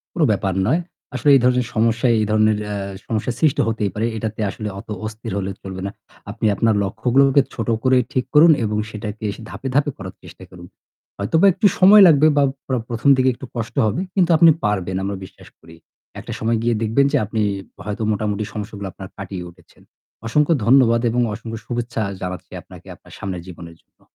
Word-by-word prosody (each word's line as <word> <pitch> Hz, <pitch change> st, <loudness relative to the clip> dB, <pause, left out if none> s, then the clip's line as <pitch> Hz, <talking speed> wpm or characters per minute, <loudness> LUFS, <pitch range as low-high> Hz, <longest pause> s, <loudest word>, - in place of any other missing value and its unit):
কোন -, -, 0 dB
ব্যাপার 95 Hz, -2 st, -1 dB
নয়। 155 Hz, +9 st, +2 dB, 0.3 s
আসলে 135 Hz, +3 st, +2 dB
এই 135 Hz, -, +4 dB
ধরনের 125 Hz, -1 st, +2 dB
সমস্যায় 115 Hz, +2 st, +2 dB
এই 105 Hz, -, 0 dB
ধরনের 110 Hz, 0 st, +3 dB
এ্যা 105 Hz, 0 st, -4 dB, 0.3 s
সমস্যা 115 Hz, +2 st, -2 dB
সৃষ্টি 155 Hz, -4 st, +2 dB
হতেই 105 Hz, -3 st, -1 dB
পারে। 110 Hz, +2 st, -1 dB
এটাতে 110 Hz, 0 st, -4 dB
আসলে 105 Hz, +2 st, -6 dB
অত -, -, -11 dB, 0.2 s
অস্থির 110 Hz, -1 st, -7 dB
হলে 95 Hz, 0 st, -3 dB
চলবে 95 Hz, -1 st, -7 dB
না। 100 Hz, -, -3 dB, 0.4 s
আপনি 110 Hz, +1 st, -2 dB
আপনার 110 Hz, +2 st, +2 dB
লক্ষ্যগুলোকে 130 Hz, +7 st, +3 dB
ছোট 115 Hz, -2 st, -4 dB
করে 130 Hz, 0 st, +3 dB, 0.2 s
ঠিক 130 Hz, -3 st, 0 dB
করুন 160 Hz, +2 st, +7 dB
এবং 105 Hz, 0 st, -1 dB
সেটাকে 105 Hz, 0 st, -6 dB, 0.2 s
ধাপে, 135 Hz, -, -8 dB
ধাপে 145 Hz, +1 st, +2 dB
করার 95 Hz, -1 st, -8 dB
চেষ্টা -, -, -13 dB
করুন। 90 Hz, -1 st, -12 dB, 0.5 s
হয়তোবা 160 Hz, -, +2 dB
একটু 195 Hz, +3 st, +1 dB
সময় 200 Hz, +2 st, +8 dB
লাগবে 155 Hz, -1 st, +5 dB
বা 145 Hz, -, +4 dB, 0.2 s
প্র 130 Hz, -, -1 dB
১ম 120 Hz, +3 st, -1 dB
দিকে 130 Hz, 0 st, +2 dB
একটু 130 Hz, -, -10 dB
কষ্ট 115 Hz, -1 st, -4 dB
হবে 110 Hz, -, -1 dB
কিন্তু 180 Hz, -3 st, +2 dB
আপনি 165 Hz, +1 st, +7 dB
পারবেন 95 Hz, -3 st, -1 dB
আমরা 100 Hz, 0 st, -3 dB
বিশ্বাস -, -, -15 dB
করি। 80 Hz, 0 st, -15 dB, 0.4 s
একটা -, -, -8 dB
সময় 115 Hz, +1 st, 0 dB
গিয়ে 120 Hz, 0 st, +1 dB
দেখবেন 115 Hz, +6 st, +2 dB
যে -, -, +3 dB
আপনি 110 Hz, +1 st, -2 dB, 0.4 s
হয়তো 105 Hz, +2 st, -4 dB
মোটামুটি 105 Hz, 0 st, -2 dB
সমস্যাগুলো 105 Hz, -1 st, -6 dB
আপনার 95 Hz, +2 st, -10 dB
কাটিয়ে 95 Hz, -2 st, -7 dB
উঠেছেন। 85 Hz, 0 st, -23 dB, 0.4 s
অসংখ্য 150 Hz, +7 st, +2 dB
ধন্যবাদ 120 Hz, -2 st, +5 dB
এবং 125 Hz, +1 st, 0 dB
অসংখ্য 115 Hz, 0 st, -7 dB
শুভেচ্ছা 120 Hz, -2 st, -3 dB, 0.2 s
জানাচ্ছি 90 Hz, 0 st, -6 dB
আপনাকে, -, -, -15 dB
আপনার -, -, -19 dB
সামনের 95 Hz, -3 st, -5 dB
জীবনের 85 Hz, -2 st, -11 dB
জন্য। -, -, -52 dB
110 Hz, 185 wpm, -20 LUFS, 100-130 Hz, 0.5 s, সময়